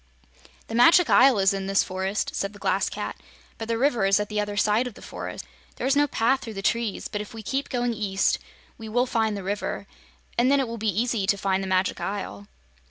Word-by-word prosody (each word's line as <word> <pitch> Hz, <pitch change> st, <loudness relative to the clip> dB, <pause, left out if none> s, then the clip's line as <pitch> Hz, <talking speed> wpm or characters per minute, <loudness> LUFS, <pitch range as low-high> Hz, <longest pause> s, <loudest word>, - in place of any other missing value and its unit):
"The -, -, -9 dB
Magic 330 Hz, +8 st, +6 dB
Isle 260 Hz, -2 st, +6 dB
is 195 Hz, 0 st, +3 dB
in 195 Hz, -1 st, -3 dB
this 195 Hz, 0 st, +3 dB
forest," 190 Hz, +2 st, -2 dB
said 200 Hz, +1 st, -2 dB
the -, -, -12 dB
Glass -, -, 0 dB
Cat, -, -, -5 dB, 0.4 s
"but 225 Hz, -, -5 dB
the 230 Hz, 0 st, 0 dB
river 245 Hz, -4 st, +2 dB
is 195 Hz, +1 st, +4 dB
at 210 Hz, -, -3 dB
the 210 Hz, 0 st, -1 dB
other 205 Hz, 0 st, -2 dB
side 215 Hz, +4 st, +2 dB
of 235 Hz, -, -9 dB
the -, -, -13 dB
forest. -, -, -7 dB, 0.3 s
There -, -, -4 dB
is 270 Hz, +1 st, +3 dB
no 290 Hz, 0 st, +4 dB
path 265 Hz, +1 st, +1 dB
through 225 Hz, -2 st, -7 dB
the 195 Hz, -, -5 dB
trees, 230 Hz, -1 st, -1 dB
but 210 Hz, -, -4 dB
if 210 Hz, +3 st, -9 dB
we 220 Hz, -, -8 dB
keep 270 Hz, +7 st, -2 dB
going 245 Hz, -1 st, 0 dB
east, 200 Hz, -3 st, 0 dB, 0.4 s
we 220 Hz, -1 st, -7 dB
will 245 Hz, +3 st, +2 dB
find 220 Hz, -4 st, 0 dB
the 195 Hz, -, -6 dB
river, 205 Hz, +2 st, -3 dB, 0.5 s
and 245 Hz, +2 st, +4 dB
then 280 Hz, -, +4 dB
it 265 Hz, -, 0 dB
will 230 Hz, 0 st, -6 dB
be 220 Hz, 0 st, 0 dB
easy 220 Hz, 0 st, 0 dB
to 200 Hz, -, +3 dB
find 190 Hz, -1 st, 0 dB
the 190 Hz, -, -4 dB
Magic 185 Hz, 0 st, +1 dB
Isle." 105 Hz, -, -5 dB
215 Hz, 235 wpm, -25 LUFS, 195-240 Hz, 0.5 s, Magic